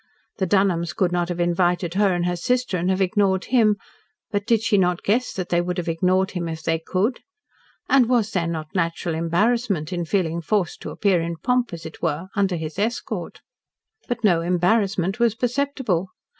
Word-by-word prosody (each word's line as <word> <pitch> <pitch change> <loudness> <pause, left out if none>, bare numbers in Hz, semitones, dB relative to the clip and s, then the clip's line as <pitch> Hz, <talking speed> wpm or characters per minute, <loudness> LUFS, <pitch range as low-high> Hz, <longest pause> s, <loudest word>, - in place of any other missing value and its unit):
The 190 - 0
Dunholms 175 -3 +1
could 180 -2 +1
not 175 0 0
have 175 -1 -3
invited 175 0 +1
her 200 0 +3
and 175 -1 0
her 180 0 0
sister, 250 +3 0
and 180 +1 0
have 190 +1 +1
ignored 190 -1 +1
him; 225 -5 +3 0.6
but 205 +1 -2
did 230 -2 +3
she 225 -2 +2
not 180 -3 +2
guess 240 +5 +1
that 185 -2 -4
they 175 0 +2
would 180 +1 -3
have 175 - -3
ignored 185 +3 +1
him, 175 -2 -3
if 160 -1 -6
they 165 0 0
could? 195 +9 -1 0.7
and 255 -4 +4
was 230 -4 +2
there 170 -3 0
not 155 -2 -5
natural 170 -1 -1
embarrassment 180 +1 0
in 175 -1 -2
feeling 170 -2 0
forced 185 0 -1
to - - -6
appear 195 -5 +1
in 170 0 -3
pomp, 250 +3 0
as 170 -1 -8
it 160 - -9
were, 165 +3 -2
under 195 -3 +1
his 160 +1 -5
escort? 225 +4 -3 0.7
But 245 -1 -3
no 175 -6 +4
embarrassment 190 +3 +1
was 235 -2 +3
perceptible. 245 - -1
185 Hz, 190 wpm, -23 LUFS, 170-215 Hz, 0.7 s, and